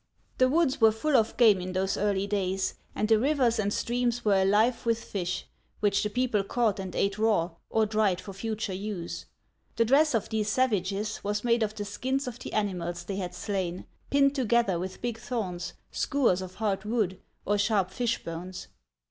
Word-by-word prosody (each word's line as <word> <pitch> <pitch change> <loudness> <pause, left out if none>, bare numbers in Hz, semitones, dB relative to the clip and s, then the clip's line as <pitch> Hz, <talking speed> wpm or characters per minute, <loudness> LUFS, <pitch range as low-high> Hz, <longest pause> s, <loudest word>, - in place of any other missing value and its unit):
The 255 0 +5
woods 300 -3 +2
were 220 -1 +7
full 270 +7 0
of 225 -2 +2
game 215 -6 +6
in 185 +1 -5
those 190 +1 0
early 200 -1 0
days, 195 -2 -1 0.2
and 215 - 0
the 220 -1 +5
rivers 255 -3 +2
and 205 -1 +1
streams 240 +1 -1
were 200 -2 +4
alive 215 +5 +3
with 230 -1 0
fish, 180 -2 -3 0.3
which 205 -1 +2
the 210 - -1
people 240 -3 +1
caught 220 -1 0
and 190 -1 -5
ate 200 +1 0
raw, 210 -6 +2 0.2
or 220 -1 +2
dried 210 -4 +1
for 195 - -8
future 215 0 -3
use. 190 -3 -5 0.5
The 230 - +3
dress 280 +3 +4
of 225 - -1
these 215 -1 -1
savages 210 -3 0
was 205 +1 -1
made 235 -1 +2
of 215 -1 -1
the 205 - -4
skins 260 +6 -2
of 245 0 -6
the - - -7
ani 205 -2 +1
mals 175 0 -5
they 195 0 -4
had 180 -2 -4
slain, 185 -3 -3 0.2
pinned 275 0 +4
together 235 - +2
with 185 +4 -6
big 235 -2 -2
thorns, 185 -9 -4 0.2
skewers 250 -10 +1
of 185 0 -8
hard 200 -2 -1
wood, 210 -4 -1 0.3
or 205 +1 +1
sharp 200 -3 +2
fishbones. 185 -6 -4
210 Hz, 190 wpm, -28 LUFS, 190-235 Hz, 0.5 s, were